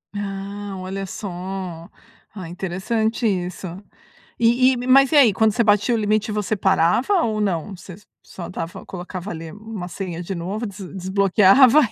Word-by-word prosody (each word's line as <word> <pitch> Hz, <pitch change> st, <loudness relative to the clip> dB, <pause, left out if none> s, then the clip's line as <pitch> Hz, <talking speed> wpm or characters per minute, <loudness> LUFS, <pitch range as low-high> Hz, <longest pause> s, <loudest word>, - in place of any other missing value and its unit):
Ah, 200 Hz, 0 st, -5 dB
olha 190 Hz, +1 st, -5 dB
só! 185 Hz, -3 st, -6 dB, 0.5 s
Ah 185 Hz, -4 st, -7 dB
interessante 215 Hz, +6 st, -2 dB
isso. 185 Hz, -1 st, -2 dB, 0.8 s
E 245 Hz, +3 st, +4 dB
e 255 Hz, -, -1 dB
mas 275 Hz, +2 st, +5 dB
e -, -, +4 dB
aí, 250 Hz, -8 st, +7 dB
quando 220 Hz, 0 st, +3 dB
você 235 Hz, +1 st, +2 dB
batia 205 Hz, +2 st, +3 dB
o 230 Hz, -, +1 dB
limite 215 Hz, 0 st, 0 dB
você 210 Hz, 0 st, -1 dB
parava 190 Hz, -, +2 dB
ou 215 Hz, -4 st, -1 dB
não? 190 Hz, 0 st, -2 dB
Você 185 Hz, +1 st, -11 dB
s 205 Hz, +4 st, -15 dB, 0.2 s
só 175 Hz, -, -9 dB
dava 165 Hz, -2 st, -6 dB
colocava 185 Hz, +1 st, -7 dB
ali 160 Hz, -1 st, -7 dB
uma 210 Hz, -3 st, -7 dB
senha 175 Hz, -1 st, -5 dB
de 190 Hz, +2 st, -5 dB
novo 195 Hz, +7 st, -4 dB
des 200 Hz, -2 st, -9 dB, 0.2 s
desbloqueava? 200 Hz, +8 st, +5 dB
195 Hz, 160 wpm, -22 LUFS, 185-220 Hz, 0.8 s, aí